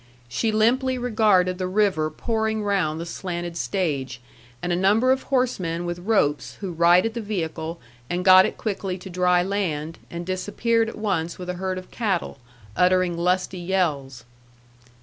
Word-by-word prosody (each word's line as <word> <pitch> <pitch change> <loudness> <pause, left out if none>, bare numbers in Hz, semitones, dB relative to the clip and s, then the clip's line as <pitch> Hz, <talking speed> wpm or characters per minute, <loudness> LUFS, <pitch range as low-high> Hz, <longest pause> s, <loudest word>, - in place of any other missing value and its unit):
She 220 - -1
limply 255 +4 +2
regarded 210 -7 +2
the 185 - -1
river 185 -5 +1
pouring 220 +5 -2
round 185 -6 0
the 170 - -4
slanted 175 -1 -5
stage, 145 -9 -2 0.4
and 175 +4 -2
a - - +2
number 210 +8 +3
of 265 0 +2
horsemen 185 -11 -1
with 175 0 -4
ropes, 175 -7 0
who 195 -3 -4
righted 175 +6 +4
the 235 - -4
vehicle, 165 -5 -4 0.3
and 180 +1 -2
got 185 0 +8
it - - -7
quickly 195 -3 -3
to 185 0 -10
dry 180 0 +3
land, 165 -5 -2
and 170 0 -6
disappeared 225 +5 0
at - - -9
once 180 -6 -2
with 180 -1 -7
a 180 0 -8
herd 190 -1 -2
of 185 - -9
cattle, 195 - -2 0.4
uttering 180 -1 +3
lusty 180 +2 0
yells. 150 -9 -1
185 Hz, 160 wpm, -24 LUFS, 170-210 Hz, 0.4 s, got